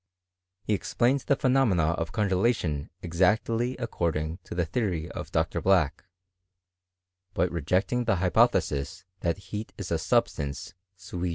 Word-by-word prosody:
He 110 - 0
ex 100 - -3
plained 125 +4 +3
the 140 - +4
phenomena 125 - +3
of 85 0 -3
congelation 95 -7 0
exactly 110 +8 +1
accord^^ 90 -9 -2
ing 80 +3 -3
to - - -7
the 90 -1 +1
theory 85 -4 -2
of - - -7
Dr. - - 0
Black, 90 -5 +2 1.3
but 90 +1 +1
rejecting 90 - 0
the 110 - +3
hypothesis, 80 -4 +1
that 85 0 0
heat 105 +3 -7
is - - -6
a - - +1
substance 70 -1 -1 0.2
iui 90 -1 -4
90 Hz, 135 wpm, -27 LUFS, 85-115 Hz, 1.3 s, the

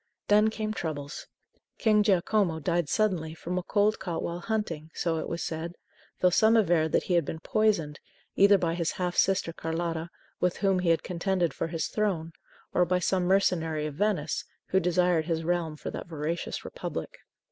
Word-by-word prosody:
Then 210 +1 +5
came 215 0 -3
troubles. 150 -6 -5 0.5
King 215 -2 +4
Giacomo 195 -3 +2
died 170 +1 0
suddenly 180 -8 0
from 180 +2 -3
a - - -3
cold 210 +3 +1
caught 175 -3 -3
while 170 +1 -3
hunting, 175 -7 -3
so 165 -2 0
it - - -4
was 170 - -3
said; 165 +2 -4 0.5
though 180 - +5
some 220 +5 +5
averred 170 -7 +3
that - - +3
he 180 - -1
had 170 -1 +4
been 160 - -5
poisoned, 200 -7 +1 0.4
either 200 0 +6
by 170 -3 0
his 170 -1 -1
half 180 -1 -2
sister 185 -3 +2
Carlotta, 165 0 -3 0.3
with 180 -1 +1
whom 195 -2 +2
he 180 -2 +1
had 165 - +3
contended 180 -1 0
for - - -2
his 165 -2 -2
throne, 185 -7 -1 0.4
or 180 - +4
by 180 +1 +1
some 180 0 +1
mercenary 165 -5 +2
of 150 - -4
Venice, 170 -3 0 0.3
who 190 - +3
desired 180 -2 +2
his 165 -1 -1
realm 165 -2 -1
for - - -5
that - - -6
voracious 160 +1 -4
Republic. - - -6
175 Hz, 180 wpm, -28 LUFS, 160-195 Hz, 0.5 s, either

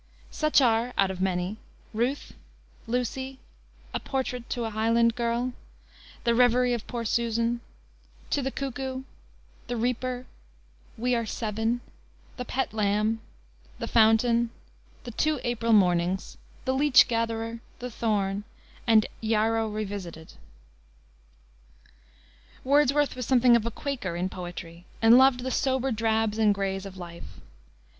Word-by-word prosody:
Such 305 -2 +3
are 235 0 +2
(out 195 -1 +3
of 185 -1 -6
many) 185 +2 -1 0.4
Ruth, 245 +6 -1 0.5
Lucy, 255 +3 -2 0.6
A - - -1
Portrait, 250 -3 -3
To 240 - -2
a 225 - -3
Highland 230 +2 +3
Girl, 240 +2 -1 0.7
The 235 - +3
Reverie 245 +1 +4
of 235 -3 -4
Poor 235 -2 -4
Susan, 235 +1 0 0.7
To 285 - +1
the 265 - -1
Cuckoo, 265 -1 -4 0.6
The 245 -1 -3
Reaper, 250 +2 -2 0.7
We 245 +2 0
Are 230 -2 0
Seven, 225 +2 -1 0.6
The 250 - -4
Pet 265 0 -2
Lamb, 215 +1 +1 0.6
The - - -4
Fountain, 230 +1 +4 0.5
The 240 - -7
Two 305 +5 0
April 230 -1 0
Mornings, 180 -2 +2 0.3
The 260 - +1
Leech 275 -1 +6
Gatherer, 230 0 -2 0.2
The 250 0 -6
Thorn, 205 -3 -1 0.4
and 220 -2 +6 0.2
Yarrow 225 0 +1
Revisited. 195 -6 -6 2.3
Wordsworth 285 +1 +3
was 250 -3 -5
something 250 -2 +5
of 235 -1 +1
a - - 0
Quaker 240 - -4
in 180 +2 -1
poetry, 175 -2 -8
and 230 +2 +7
loved 260 -1 +5
the 260 +1 -3
sober 265 0 0
drabs 220 -1 0
and 210 -2 +4
grays 195 0 -2
of 190 -1 -11
life. 170 -1 -10
230 Hz, 130 wpm, -27 LUFS, 215-250 Hz, 2.3 s, and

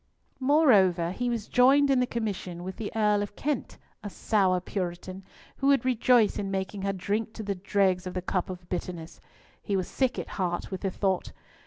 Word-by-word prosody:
Moreover, 210 - +4
he 245 +6 -2
was 230 -3 -3
joined 275 +3 +5
in 265 - +4
the 250 - +1
commission 190 -7 -4
with 185 0 -6
the 215 - -5
Earl 210 -2 +2
of 205 0 -5
Kent, 290 -3 -3 0.3
a 205 - -4
sour 190 -3 +1
Puritan, 185 0 -5 0.3
who 275 - 0
would 275 -3 +4
rejoice 245 -2 +3
in 195 - -3
making 195 +1 -3
her 195 0 0
drink 210 +4 -2
to 220 - -7
the 200 -1 -1
dregs 190 -1 0
of 180 - -6
the 185 - -1
cup 185 0 -1
of 180 -1 -8
bitterness! 175 -2 -5 0.4
He 200 - -2
was 185 -2 -1
sick 260 -2 0
at - - -5
heart 175 +1 -2
with 190 - -5
the 195 - 0
thought. 190 -1 -1
200 Hz, 195 wpm, -27 LUFS, 185-235 Hz, 0.4 s, joined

